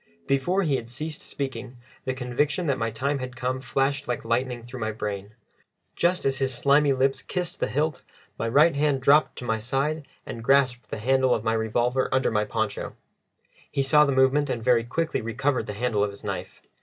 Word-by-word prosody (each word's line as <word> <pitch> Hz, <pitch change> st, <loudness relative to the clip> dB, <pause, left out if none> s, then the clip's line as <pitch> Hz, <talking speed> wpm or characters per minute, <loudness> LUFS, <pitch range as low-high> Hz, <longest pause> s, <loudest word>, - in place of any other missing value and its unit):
Before 175 Hz, +8 st, +1 dB
he 145 Hz, -6 st, +1 dB
had 115 Hz, -, -7 dB
ceased 150 Hz, +5 st, -5 dB
speaking, 130 Hz, -2 st, -5 dB, 0.3 s
the 130 Hz, -1 st, -1 dB
conviction 135 Hz, +6 st, -1 dB
that 140 Hz, -4 st, 0 dB
my 115 Hz, 0 st, 0 dB
time 140 Hz, +6 st, -1 dB
had 130 Hz, 0 st, -6 dB
come 130 Hz, +1 st, -2 dB
flashed 135 Hz, +2 st, 0 dB
like 125 Hz, -, -3 dB
lightning 120 Hz, +1 st, -1 dB
through 120 Hz, +2 st, -8 dB
my 110 Hz, -1 st, -1 dB
brain. 105 Hz, -1 st, -5 dB, 0.6 s
Just 180 Hz, +1 st, +1 dB
as 135 Hz, 0 st, +1 dB
his 135 Hz, -1 st, 0 dB
slimy 140 Hz, +3 st, +3 dB
lips 135 Hz, 0 st, +1 dB
kissed 180 Hz, -2 st, -4 dB
the -, -, 0 dB
hilt, 145 Hz, +6 st, -1 dB, 0.3 s
my 115 Hz, -, -2 dB
right 150 Hz, +6 st, +5 dB
hand 145 Hz, -2 st, +1 dB
dropped 145 Hz, +3 st, +5 dB
to 125 Hz, -, -7 dB
my 110 Hz, -1 st, 0 dB
side 140 Hz, +6 st, -1 dB, 0.2 s
and 115 Hz, -, -7 dB
grasped 130 Hz, -1 st, +2 dB
the -, -, -4 dB
handle 130 Hz, +3 st, +3 dB
of 110 Hz, -, -4 dB
my 110 Hz, 0 st, +1 dB
revolver 120 Hz, +3 st, +1 dB
under 130 Hz, 0 st, +2 dB
my 105 Hz, -1 st, +1 dB
poncho. 110 Hz, -1 st, -3 dB, 0.7 s
He 140 Hz, -, 0 dB
saw 150 Hz, +2 st, +5 dB
the 140 Hz, -, +1 dB
movement, 130 Hz, +2 st, +3 dB
and 115 Hz, -2 st, -2 dB
very 120 Hz, -1 st, +4 dB
quickly 160 Hz, +6 st, -1 dB
recovered 115 Hz, +2 st, -1 dB
the 105 Hz, -, -4 dB
handle 110 Hz, -1 st, 0 dB
of 105 Hz, -, 0 dB
his 100 Hz, -, -12 dB
knife. -, -, -5 dB
130 Hz, 200 wpm, -26 LUFS, 115-140 Hz, 0.7 s, right